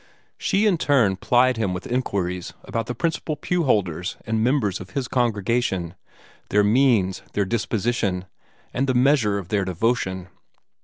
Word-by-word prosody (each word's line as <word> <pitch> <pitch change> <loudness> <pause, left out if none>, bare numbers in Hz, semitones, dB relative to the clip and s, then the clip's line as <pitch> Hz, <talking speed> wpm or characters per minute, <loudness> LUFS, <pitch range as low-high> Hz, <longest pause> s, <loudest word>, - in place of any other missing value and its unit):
She 200 +2 +1
in 190 -6 +3
turn 125 -12 +3
plied 125 +4 +3
him 100 -5 -1
with 90 - -6
inquiries 95 -8 -2
about 115 -2 -3
the 125 - -4
principal 160 +2 -2
pew 175 +2 -1
holders 90 - 0
and 110 0 0
members 120 -7 +1
of 95 - -9
his 130 -3 -1
congregation 115 -7 0 0.6
their 105 0 +3
means, 105 -4 +3
their 100 - +1
disposition, 105 -3 -1 0.5
and 135 +2 0
the 130 - +1
measure 125 -5 +3
of 95 -3 -6
their 105 -2 +1
devotion. 95 -1 -1
110 Hz, 150 wpm, -23 LUFS, 95-130 Hz, 0.6 s, in